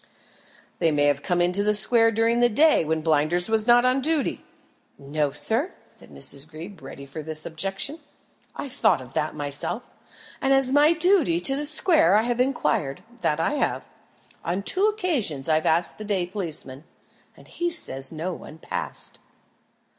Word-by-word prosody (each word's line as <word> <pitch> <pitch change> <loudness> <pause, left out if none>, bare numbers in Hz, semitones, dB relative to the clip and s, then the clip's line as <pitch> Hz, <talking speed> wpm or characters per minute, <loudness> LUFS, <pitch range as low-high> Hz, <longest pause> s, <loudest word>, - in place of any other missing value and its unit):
"They 165 - +2
may 145 -1 +1
have 145 -1 +2
come 175 +1 0
into 180 +3 +1
the 210 0 +2
square 225 +2 +4
during 225 +2 +1
the 240 0 +4
day, 305 - +4
when 160 0 -1
Blinders 160 +4 +1
was 220 0 +2
not 240 +1 +5
on 255 +2 +2
duty." 310 0 -1 0.5
"No, 145 +1 -2
sir," 225 - +1
said - - -15
Miss 140 -1 -4
Greeb, 160 +5 -11
ready 140 - -10
for 140 +3 -8
this 155 0 -1
objection. 195 - -4 0.6
"I - - -5
thought 265 - +2
of 130 0 -12
that 150 - -2
myself, 145 -1 -2 0.6
and 270 0 +2
as 270 -1 +1
my 295 +3 +5
duty 335 - +2
to 270 +9 +3
the 295 +1 +1
square 305 - +4
I 215 - +4
have 240 0 -2
inquired 180 - -1 0.2
that 150 -6 0
I 165 - 0
have. 295 - -2 0.6
On 180 +4 -2
two 380 - +2
occasions 300 - -1
I've 155 0 +1
asked 170 +5 +1
the - - -6
day 200 -4 -1
policeman, 160 -7 -4 0.5
and - - -17
he 345 0 -2
says 135 - -3
no 165 +3 -4
one 155 - -11
passed." - - -6
195 Hz, 170 wpm, -24 LUFS, -, 0.6 s, not